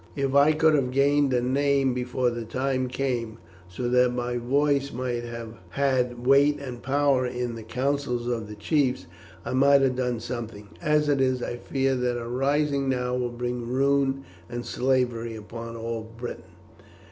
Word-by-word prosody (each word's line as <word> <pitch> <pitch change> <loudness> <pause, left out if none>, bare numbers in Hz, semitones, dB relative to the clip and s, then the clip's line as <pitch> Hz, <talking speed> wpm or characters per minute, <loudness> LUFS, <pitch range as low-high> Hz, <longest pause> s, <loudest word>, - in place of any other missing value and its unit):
"If 135 -1 -1
I 140 +2 +6
could 160 0 +4
have 135 -4 +2
gained 140 +1 +3
a 125 -1 +2
name 135 0 +2
before 125 0 0
the 120 0 -4
time 130 +3 -1
came, 125 -4 -2 0.3
so 120 +8 -4
that 125 0 +4
my 125 0 -2
voice 140 +3 +1
might 120 -1 -3
have 115 -1 -7
had 125 -1 0
weight 140 +2 +5
and 125 -4 -7
power 140 0 +2
in 125 -1 -3
the 115 - -7
councils 125 +1 -1
of 120 -3 -2
the 105 - -8
chiefs, 130 - 0 0.4
I - - -3
might 140 +1 +5
have 130 -1 +2
done 125 -2 -1
something. 115 -3 -6
As 150 -2 +2
it 140 -2 +2
is, 130 -1 +1
I 120 - -3
fear 135 +2 0
that 125 -1 0
a 115 - -6
rising 140 +2 +1
now 125 -1 0
will 125 -1 -1
bring 120 0 -4
ruin 135 +1 +1 0.3
and 120 0 -5
slavery 125 -3 0
upon 115 +2 -8
all 115 0 -4 0.2
Britain." 120 0 -6
125 Hz, 170 wpm, -26 LUFS, 120-140 Hz, 0.4 s, I